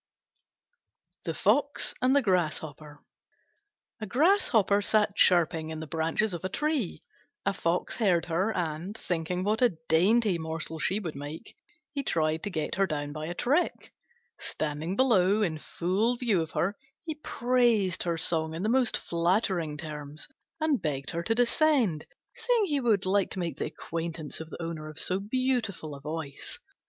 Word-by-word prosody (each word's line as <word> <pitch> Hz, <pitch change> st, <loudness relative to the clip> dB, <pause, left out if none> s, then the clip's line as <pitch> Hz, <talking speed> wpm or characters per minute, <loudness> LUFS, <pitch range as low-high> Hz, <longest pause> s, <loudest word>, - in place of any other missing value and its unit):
THE -, -, -2 dB
FOX -, -, +2 dB
AND 255 Hz, +2 st, +4 dB
THE 285 Hz, -, +4 dB
GRASSHOPPER 155 Hz, -6 st, -1 dB, 1.0 s
A 215 Hz, -, -4 dB
Grasshopper 240 Hz, -, +3 dB
sat 210 Hz, -1 st, +2 dB
chirping 165 Hz, -3 st, +4 dB
in 160 Hz, 0 st, -5 dB
the 160 Hz, -, -5 dB
branches 165 Hz, +6 st, 0 dB
of 175 Hz, -, -5 dB
a 185 Hz, -, -1 dB
tree. 295 Hz, -, -1 dB, 0.4 s
A -, -, +2 dB
Fox 175 Hz, -1 st, -1 dB
heard 180 Hz, -7 st, +2 dB
her, 180 Hz, +6 st, 0 dB
and, 175 Hz, +2 st, -3 dB
thinking 180 Hz, +1 st, -2 dB
what 215 Hz, +4 st, 0 dB
a 235 Hz, -10 st, +3 dB
dainty 190 Hz, +3 st, +3 dB
morsel 160 Hz, 0 st, -3 dB
she 195 Hz, +6 st, +1 dB
would 170 Hz, -7 st, -5 dB
make, 145 Hz, +8 st, -8 dB, 0.4 s
he 280 Hz, -, -1 dB
tried 160 Hz, -, 0 dB
to 205 Hz, -, -3 dB
get 155 Hz, -5 st, -2 dB
her 195 Hz, 0 st, +2 dB
down 145 Hz, -3 st, -3 dB
by 155 Hz, +1 st, -5 dB
a 175 Hz, -, -4 dB
trick. 290 Hz, -, 0 dB, 0.5 s
Standing 155 Hz, +4 st, -3 dB
below 210 Hz, -4 st, +4 dB
in 160 Hz, -5 st, -1 dB
full 195 Hz, +10 st, 0 dB
view 225 Hz, -8 st, +2 dB
of 160 Hz, -, -4 dB
her, 195 Hz, +5 st, 0 dB, 0.3 s
he 320 Hz, -, -4 dB
praised 240 Hz, -, +1 dB
her 170 Hz, -2 st, 0 dB
song 160 Hz, -1 st, +1 dB
in 170 Hz, -, -4 dB
the 215 Hz, -, +1 dB
most 250 Hz, -1 st, +2 dB
flattering 170 Hz, -2 st, 0 dB
terms, 150 Hz, -1 st, -6 dB, 0.3 s
and 310 Hz, -5 st, +1 dB
begged 140 Hz, -3 st, -2 dB
her 170 Hz, 0 st, -2 dB
to 225 Hz, +6 st, 0 dB
descend, 245 Hz, -, +2 dB, 0.3 s
saying 475 Hz, -4 st, +1 dB
he 290 Hz, -6 st, +1 dB
would 220 Hz, -7 st, +2 dB
like 195 Hz, 0 st, +2 dB
to -, -, -4 dB
make 170 Hz, -2 st, -3 dB
the -, -, 0 dB
acquaintance 165 Hz, -2 st, -5 dB
of 160 Hz, 0 st, -7 dB
the -, -, -9 dB
owner 165 Hz, -2 st, -5 dB
of 155 Hz, -, -11 dB
so 185 Hz, +1 st, +1 dB
beautiful 225 Hz, -, -1 dB
a 140 Hz, -, -9 dB
voice. 150 Hz, -2 st, -5 dB
180 Hz, 165 wpm, -28 LUFS, 160-225 Hz, 1.0 s, AND